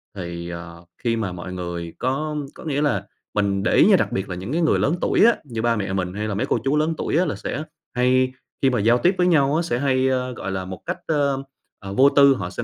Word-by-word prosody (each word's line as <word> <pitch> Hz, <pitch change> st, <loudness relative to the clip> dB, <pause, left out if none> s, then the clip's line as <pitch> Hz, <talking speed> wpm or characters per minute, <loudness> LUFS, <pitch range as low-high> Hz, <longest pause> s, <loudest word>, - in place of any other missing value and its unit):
thì, 85 Hz, -2 st, -6 dB
ờ, 85 Hz, 0 st, -9 dB, 0.2 s
khi 115 Hz, -1 st, +1 dB
mà 105 Hz, -5 st, -2 dB
mọi 90 Hz, +1 st, -7 dB
người 85 Hz, -2 st, -5 dB
có 150 Hz, +4 st, -1 dB, 0.2 s
có -, -, -11 dB
nghĩa 145 Hz, -1 st, 0 dB
là 145 Hz, -3 st, 0 dB, 0.3 s
mình 100 Hz, -2 st, 0 dB
để -, -, +1 dB
ý -, -, +6 dB
nha, -, -, +6 dB
đặc -, -, 0 dB
biệt 95 Hz, 0 st, -3 dB
là 90 Hz, -, -3 dB
những 95 Hz, +8 st, -6 dB
cái 170 Hz, +2 st, 0 dB
người 160 Hz, -, +3 dB
lớn 155 Hz, +5 st, +2 dB
tuổi -, -, +3 dB
á, 235 Hz, -, +6 dB
như 115 Hz, -5 st, -5 dB
ba 120 Hz, 0 st, +2 dB
mẹ 95 Hz, -2 st, -3 dB
mình 90 Hz, -1 st, -2 dB
hay 105 Hz, +1 st, -3 dB
là 105 Hz, -, -2 dB
mấy 120 Hz, +6 st, 0 dB
cô -, -, +1 dB
chú 140 Hz, +2 st, +1 dB
lớn 155 Hz, +2 st, +1 dB
tuổi -, -, -1 dB
á 180 Hz, -, +3 dB
là -, -, -2 dB
sẽ 155 Hz, -, -4 dB, 0.3 s
hay 130 Hz, +1 st, +2 dB, 0.3 s
khi 135 Hz, -, +4 dB
mà 125 Hz, -4 st, 0 dB
giao 115 Hz, +4 st, +4 dB
tiếp 180 Hz, +9 st, +2 dB
với 180 Hz, 0 st, +3 dB
nhau 145 Hz, -3 st, +3 dB
á 165 Hz, -, +2 dB
sẽ 125 Hz, -8 st, -1 dB
hay, 130 Hz, -2 st, +2 dB
ơ, 125 Hz, -1 st, -1 dB
gọi 95 Hz, -, -5 dB
là, 95 Hz, -1 st, -3 dB
một 95 Hz, -1 st, -8 dB
cách, -, -, -3 dB
ơm, 140 Hz, -3 st, +1 dB, 0.4 s
à, 100 Hz, -1 st, -8 dB
vô 135 Hz, +8 st, +5 dB
tư. 140 Hz, -1 st, +6 dB
Họ 90 Hz, -5 st, -4 dB
sẽ 95 Hz, -, -5 dB
125 Hz, 275 wpm, -22 LUFS, 95-140 Hz, 0.4 s, ý